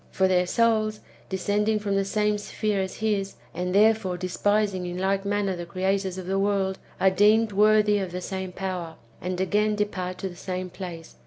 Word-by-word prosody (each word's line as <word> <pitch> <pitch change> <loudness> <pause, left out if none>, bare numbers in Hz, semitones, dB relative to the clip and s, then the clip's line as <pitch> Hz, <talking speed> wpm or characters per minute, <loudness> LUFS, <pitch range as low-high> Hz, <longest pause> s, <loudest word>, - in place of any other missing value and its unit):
For 190 - +2
their 180 -1 +2
souls, 215 -1 +2 0.3
descending 205 +3 +1
from 205 -1 -1
the 195 - +2
same 210 +1 +1
sphere 205 -1 -1
as 190 0 -4
his, 205 -3 -1 0.2
and 180 +2 -2
therefore 215 -3 +3
despising 190 +1 0
in 175 0 -4
like 195 +1 0
manner 200 -1 0
the 175 -1 -6
creators 190 +1 -1
of 185 - -6
the 195 +1 0
world, 195 -1 0 0.2
are 190 - +4
deemed 210 +3 +4
worthy 210 0 +4
of 190 -3 -3
the 180 - -4
same 190 0 -4
power, 180 -3 -4 0.3
and 180 0 -3
again 210 +3 +2
depart 185 -3 -2
to 190 - -4
the 175 - -11
same 185 0 -5
place. 170 -3 -8
195 Hz, 185 wpm, -26 LUFS, 185-210 Hz, 0.3 s, are